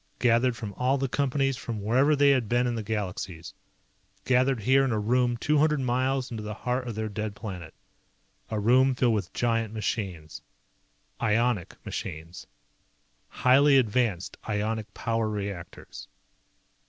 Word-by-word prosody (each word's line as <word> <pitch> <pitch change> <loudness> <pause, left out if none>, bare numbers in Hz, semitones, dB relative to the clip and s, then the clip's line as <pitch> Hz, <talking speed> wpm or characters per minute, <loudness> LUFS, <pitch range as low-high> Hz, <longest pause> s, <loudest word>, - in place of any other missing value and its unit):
Gathered 120 0 +2
from 110 -3 -6
all 130 +2 +2
the 135 0 -1
Companies, 135 0 0
from 115 -4 -5
wherever 130 +9 +3
they 140 0 +5
had 125 -6 +1
been 120 +1 +2
in 120 - 0
the 115 - -3
Galaxies. 95 -5 -4 0.7
Gathered 130 -1 +2
here 135 +5 +4
in 135 - 0
a 110 - 0
room 120 +3 +1
two 150 +5 +1
hundred 150 -1 +3
miles 130 +1 0
into 110 -2 -5
the 105 0 -5
heart 125 +2 -2
of 115 - -4
their 110 0 -2
dead 105 0 -4
planet. 90 -8 -8 0.7
A 110 - -2
room 130 +5 +4
filled 125 -2 +2
with 100 -4 -2
giant 115 -2 -1
machines. 95 -7 -4 0.8
Ionic 115 -3 +1
machines. 85 +3 -6 0.8
Highly 135 +2 +4
advanced 110 -6 0
ionic 110 +1 -2
power 115 -1 -1
reactors. 100 -4 -6
115 Hz, 145 wpm, -27 LUFS, 105-130 Hz, 0.8 s, they